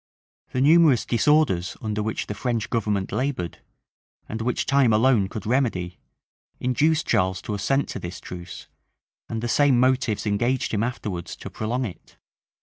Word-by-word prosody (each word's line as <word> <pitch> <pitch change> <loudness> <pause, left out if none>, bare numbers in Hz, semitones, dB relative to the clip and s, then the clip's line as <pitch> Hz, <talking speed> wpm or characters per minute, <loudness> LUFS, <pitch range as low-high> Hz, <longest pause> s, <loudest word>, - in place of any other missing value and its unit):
The 130 - -1
numerous 150 -4 +5
disorders 120 - +2
under 105 -1 -2
which 110 +1 -2
the - - -4
French 115 +1 -2
government 105 -4 -1
labored, 125 - -2 0.7
and 110 +1 -5
which 120 +2 -1
time 135 -4 +3
alone 110 -3 +3
could 105 - -6
remedy, 110 -8 0 0.6
induced 150 +6 +1
Charles 95 0 +1
to 105 - -4
assent 135 +8 0
to - - -5
this 85 -1 -7
truce; 90 0 -9 0.6
and 115 0 -4
the - - 0
same 135 0 +4
motives 125 -4 +1
engaged 120 +6 0
him 105 - +1
afterwards 105 -7 -4
to - - -9
prolong 120 +4 -2
it. 90 -7 -10
115 Hz, 150 wpm, -24 LUFS, 100-130 Hz, 0.7 s, numerous